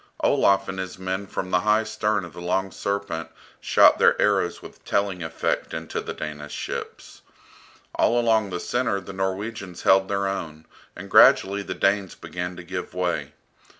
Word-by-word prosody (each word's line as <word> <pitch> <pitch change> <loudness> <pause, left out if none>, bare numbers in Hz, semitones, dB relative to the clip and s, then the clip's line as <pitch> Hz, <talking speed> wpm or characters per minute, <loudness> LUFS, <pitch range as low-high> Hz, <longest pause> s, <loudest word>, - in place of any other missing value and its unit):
Olaf 100 0 +3
and 95 - -5
his 95 -1 -5
men 95 +1 -3
from 95 -1 -4
the 90 - +4
high 105 +3 +2
stern 105 -2 -1
of 85 - -12
the 85 - -9
"Long 95 +2 -1
Serpent" 100 -5 -3 0.3
shot - - +5
their - - +4
arrows - - +2
with - - -14
telling 100 -3 -1
effect 80 0 -2
into 80 0 -4
the - - -6
Danish 75 -1 -7
ships. - - -7 0.7
All 120 - +2
along 110 -3 +2
the 90 -1 -4
centre 120 -3 -1
the 95 +1 -9
Norwegians 95 0 -4
held 95 0 +5
their 100 0 -1
own, 80 -5 -4 0.3
and - - -8
gradually 100 +1 +6
the - - -5
Danes 100 -1 +1
began 90 0 -6
to 90 - -9
give 90 +1 -6
way. 90 -1 -2
95 Hz, 170 wpm, -24 LUFS, 90-100 Hz, 0.7 s, gradually